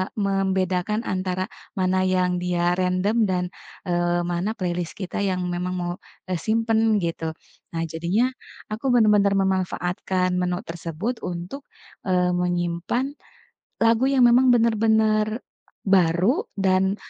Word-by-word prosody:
membedakan 195 +1 0
antara, 185 -2 -2 0.4
mana 185 0 +2
yang 180 -1 +1
dia 175 -1 +1
random, 185 +4 +1
dan, 180 -1 0 0.4
eee, 175 0 +1
mana 175 +5 -1
playlist 175 -2 -3
kita, 185 0 -4
yang 185 -1 -1
memang 180 +1 -2
mau, 175 0 -2 0.4
eee, 180 - -1
simpan, 225 +2 +1 0.2
gitu. 165 -1 -3 0.4
Nah, 165 - -1
jadinya 170 +8 +1 0.5
aku 220 +5 -5
benar-benar 210 -3 +4
memanfaatkan 185 -1 -1
menu 180 0 0
tersebut, 170 +8 -4
untuk, 180 +10 -5 0.5
eee, 180 -1 +2
menyimpan 175 +6 -1 0.8
lagu, 230 +2 +4
yang 260 -3 +4
memang 250 +2 +5
benar-benar 220 -2 +3 0.6
baru, 190 - +3
dan, 190 0 +2
185 Hz, 115 wpm, -24 LUFS, 175-215 Hz, 0.8 s, memang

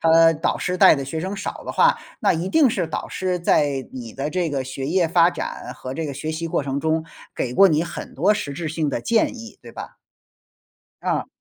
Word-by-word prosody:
他 165 0 +6
导 155 - -1
师 180 0 -1
带 155 - +7
的 140 - -3
学 160 +4 -4
生 190 +3 -4
少 - - -5
的 - - -4
话， - - +4 0.2
那 - - +3
一 170 +3 -2
定 305 -1 +5
是 180 -6 -1
导 - - -4
师 185 -1 -2
在 145 -5 +1
你 120 -4 -7
的 140 +2 -3
这 180 -3 -1
个 135 -2 -2
学 135 +1 -5
业 175 0 +2
发 170 +1 +4
展 - - -6
和 130 +1 -7
这 160 +2 -3
个 140 - -4
学 155 +3 -4
习 165 +1 -3
过 150 - 0
程 140 0 -2
中， 160 0 0 0.3
给 125 -1 -3
过 195 -1 +7
你 155 +1 +2
很 - - -8
多 195 +9 +3
实 140 -8 -4
质 160 +3 -5
性 155 -1 -1
的 130 - -2
建 230 - +1
议， 230 0 -11
对 - - -11
吧？ - - -9 1.1
啊。 - - -1
160 Hz, 245 characters per minute, -22 LUFS, 140-180 Hz, 1.1 s, 带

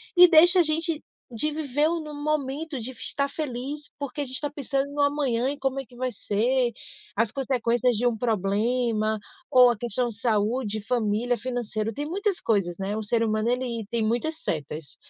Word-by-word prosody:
e 360 0 +10
deixa 350 +2 +7
a - - +6
gente 315 0 0 0.3
de 265 +7 0
viver 295 -1 0
no 320 -2 -3
momento, 295 0 -2
de 240 +3 -4
estar 280 +3 -2
feliz, 285 0 -5
porque 285 0 -5
a - - +1
gente 260 0 -6
está 290 +1 -2
pensando 280 -1 -2
no 290 0 -1
amanhã, 280 -4 +1
em 285 - -3
como 270 -1 -1
é 270 - -5
que 245 - -18
vai 255 +1 -2
ser, 240 +4 0 0.4
as 225 0 +1
consequências 250 -2 +1
de 245 - 0
um 240 -2 +2
problema, 220 +1 +1 0.3
ou 255 -3 +7
a 235 - -3
questão 240 +2 +1
de 220 -2 -9
saúde, 220 -1 0
família, 235 +1 0
financeiro, 225 -2 -3
tem 290 +6 -4
muitas 390 +4 -1
coisas, 195 -6 +1
né, 195 +2 -3
o - - -2
ser 225 +2 +1
humano, 215 0 +1
ele 245 -3 -1
tem 235 -2 0
muitas 240 +9 0
setas. 150 0 -4
250 Hz, 185 wpm, -26 LUFS, 225-290 Hz, 0.4 s, e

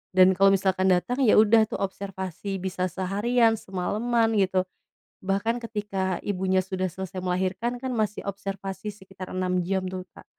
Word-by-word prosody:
Dan 185 0 +7
kalau 195 +1 +4
misalkan 190 0 +1
datang, 215 +9 +1
ya, 220 - +5
udah, 220 0 +6
tuh, - - -5
observasi 195 0 -4
bisa 185 0 -2
seharian, 215 +5 +1
semalaman, 225 +5 0
gitu. 185 -1 +2 0.6
Bahkan 200 +4 0
ketika 200 -4 -2
ibunya 190 -1 +1
sudah 185 -1 -2
selesai 185 +1 -6
melahirkan, 185 +7 -1
kan, 255 0 -4
masih 215 -2 -1
observasi 195 0 -5
sekitar 190 -2 -10
6 185 -1 0
jam, 190 +1 -1
tuh, 185 0 -4 0.2
Kak. - - -13
190 Hz, 150 wpm, -26 LUFS, 185-210 Hz, 0.6 s, Dan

